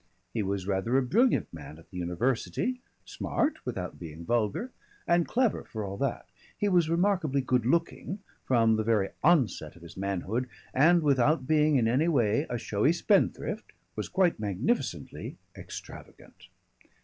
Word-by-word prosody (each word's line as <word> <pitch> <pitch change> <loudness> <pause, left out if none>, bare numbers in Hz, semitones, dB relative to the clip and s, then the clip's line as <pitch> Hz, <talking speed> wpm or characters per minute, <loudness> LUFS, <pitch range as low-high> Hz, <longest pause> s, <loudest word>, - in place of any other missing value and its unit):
He 115 - 0
was 100 -1 -2
rather 100 +6 +1
a 135 - +3
brilliant 230 - +2
man 75 -1 -9
at 80 - -18
the 90 - -8
university, 120 - -1 0.2
smart 305 - -1
without 95 -7 -4
being 85 -1 -8
vulgar 120 - 0 0.3
and 170 -1 +3
clever 245 -2 +1
for 110 -2 -5
all 100 0 -5
that. - - -2 0.3
He 205 - 0
was 175 -4 +3
remarkably 170 -5 +2
good 125 -2 +1
looking 170 +5 0 0.3
from 115 -3 +3
the 110 - 0
very 105 -3 +2
onset 130 - +2
of 85 - -16
his 85 - -11
manhood 100 +6 -2 0.2
and 165 +5 +5
without 140 0 +3
being 150 0 +3
in 120 -4 +3
any 130 +8 +2
way 130 -2 +2
a 120 - -1
showy 110 +7 +1
spendthrift, 195 +3 0 0.2
was - - -4
quite 185 - +2
magnificently 105 - -2 0.2
extravagant. - - -11
125 Hz, 150 wpm, -29 LUFS, 100-165 Hz, 0.3 s, and